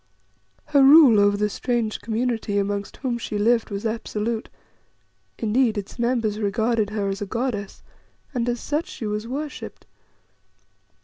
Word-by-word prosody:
Her 290 -2 +3
rule 270 -5 +8
over 205 0 +4
the 210 +1 +1
strange 230 0 -2
community 225 -2 -1
amongst 200 0 -2
whom 240 -3 -2
she 215 - -4
lived 230 +2 +2
was 200 +1 -5
absolute; 225 0 -3 0.9
indeed, 225 0 +1
its 205 +4 -6
members 235 -3 0
regarded 220 +1 0
her 205 -1 -2
as 195 +1 -3
a 205 - -3
goddess, 215 -3 -3 0.5
and 245 -2 -1
as 240 0 -1
such 300 +7 -2
she 365 -11 -7
was 210 +1 -3
worshipped. 290 +4 -6
225 Hz, 140 wpm, -23 LUFS, 210-245 Hz, 0.9 s, rule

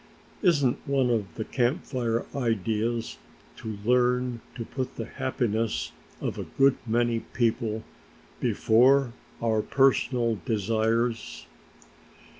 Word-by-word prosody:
Isn't 145 - +3
one 135 -3 +2
of 110 -4 0
the 110 - -4
Camp 130 +7 0
Fire 120 -3 -1
ideas 115 -1 -1 0.4
to 110 -2 -6
learn 125 0 +2
to 115 -2 -5
put 130 +1 -4
the 115 - -4
happiness 115 -4 -1 0.3
of - - -3
a - - -4
good 135 0 +5
many 120 0 +1
people 110 -2 -1 0.6
before 125 +2 +4 0.3
our 110 -1 +2
own 105 - +1
personal 125 -4 +2
desires?" 115 0 0
120 Hz, 110 wpm, -27 LUFS, 110-125 Hz, 0.6 s, good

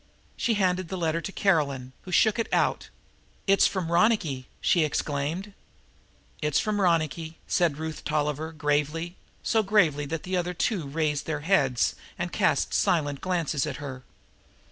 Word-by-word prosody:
She 230 - +1
handed 185 -2 +1
the 190 - -3
letter 165 -1 0
to 195 - -5
Caroline, 140 -11 +1
who 185 - -7
shook 220 +5 +4
it 230 - -2
out. - - +1 0.6
"It's 195 0 +5
from 180 -4 -3
Ronicky," 170 - +2
she 170 - +3
exclaimed. 155 +6 -2 0.9
"It's 150 -1 +1
from 210 -1 0
Ronicky," 165 -2 0
said 165 -5 +1
Ruth 160 0 -5
Tolliver 150 +1 -1
gravely, 150 +3 -1 0.3
so 225 - +3
gravely 175 -9 +2
that 160 +1 -4
the 185 +1 -2
other 180 0 -1
two 175 -4 -1
raised 150 0 -1
their 150 -2 -2
heads 145 -8 +2 0.2
and - - -3
cast - - +1
silent 145 -5 +1
glances 170 -6 0
at - - -3
her. 135 -3 -7
165 Hz, 150 wpm, -27 LUFS, 150-185 Hz, 0.9 s, It's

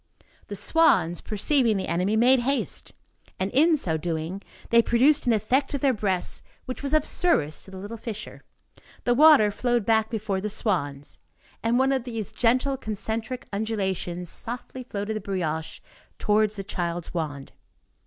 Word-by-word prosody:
The 205 - -5
swans, 200 - +3
perceiving 225 +1 +1
the 190 - -3
enemy, 185 +5 0
made 250 +4 +5
haste, 275 +4 -2 0.5
and 190 +1 -1
in 315 +4 +4
so 165 - 0
doing, 165 +3 -4 0.3
they 235 0 +7
produced 270 +5 +3
an 240 - +4
effect 265 +7 +1
of 275 - -3
their 275 -2 +3
breasts 195 -5 -1 0.2
which 255 - -6
was 280 -1 -3
of 310 - +2
service 155 - +1
to - - -12
the 190 - -9
little 205 +4 -7
fisher; 220 -1 -7 0.6
the 245 - +2
water 285 -6 +6
flowed 240 0 0
back 220 0 +2
before 205 -4 -2
the 210 - -3
swans, 145 - -2 0.4
and 230 +1 +1
one 265 +1 +3
of 265 -3 0
these 230 -4 -5
gentle 255 +3 +1
concentric 220 +2 -4
undulations 190 -4 -2
softly 245 +6 -3
floated 215 -2 -4
the - - -6
brioche 160 -5 -3 0.4
towards 215 0 +2
the 195 - -4
child's 175 -3 -4
wand. 145 -5 -4
215 Hz, 160 wpm, -25 LUFS, 190-250 Hz, 0.6 s, they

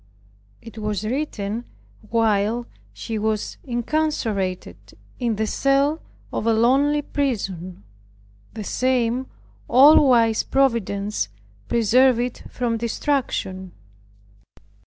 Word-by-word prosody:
It 230 -1 -10
was 210 -2 -2
written 230 -3 -3 0.4
while 225 +1 +1 0.3
she 225 -2 -5
was 215 0 -2
incarcerated 240 -7 -2 0.2
in 235 -3 0
the 220 +1 -1
cell 275 +6 +1 0.3
of 225 - -2
a 230 - +4
lonely 275 +6 +3
prison. 195 - -3 0.7
The 215 - -5
same 250 +2 0 0.4
all 280 +3 +7
wise 230 -3 +4
Providence 210 - 0 0.4
preserved 240 +2 +4
it 245 0 -3
from 235 -2 -2
destruction. 225 -6 -2
230 Hz, 95 wpm, -22 LUFS, 210-260 Hz, 0.7 s, all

